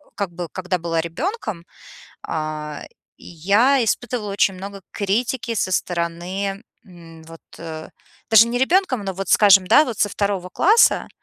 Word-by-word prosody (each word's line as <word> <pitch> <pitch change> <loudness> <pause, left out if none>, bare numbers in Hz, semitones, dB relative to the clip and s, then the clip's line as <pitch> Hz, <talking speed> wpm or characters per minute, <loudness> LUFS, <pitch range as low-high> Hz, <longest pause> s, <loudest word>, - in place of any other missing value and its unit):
как 200 -4 -3
бы, 175 -1 -7
когда 185 0 -3
была 165 -1 -1
ребёнком, 215 - -5 0.6
а, 155 -1 -5 0.4
я 210 - +2
испытывала 225 -2 -2
очень 195 -1 +2
много 195 +1 -8
критики 230 +4 -2
со 185 -3 -1
стороны, 180 +4 -3 0.2
м, 165 -3 -15
вот, 165 0 -13 0.2
э, 160 -1 -8 0.4
даже 225 +1 +7
не 245 +1 -2
ребёнком, 265 - +1
но, 190 - -3
вот, 195 +1 -6
скажем, 195 -3 +5
да, 300 +11 +6
вот 235 -6 -6
со 205 - +2
2 200 -3 -2
класса, 430 +6 +3
195 Hz, 145 wpm, -21 LUFS, 170-225 Hz, 0.6 s, даже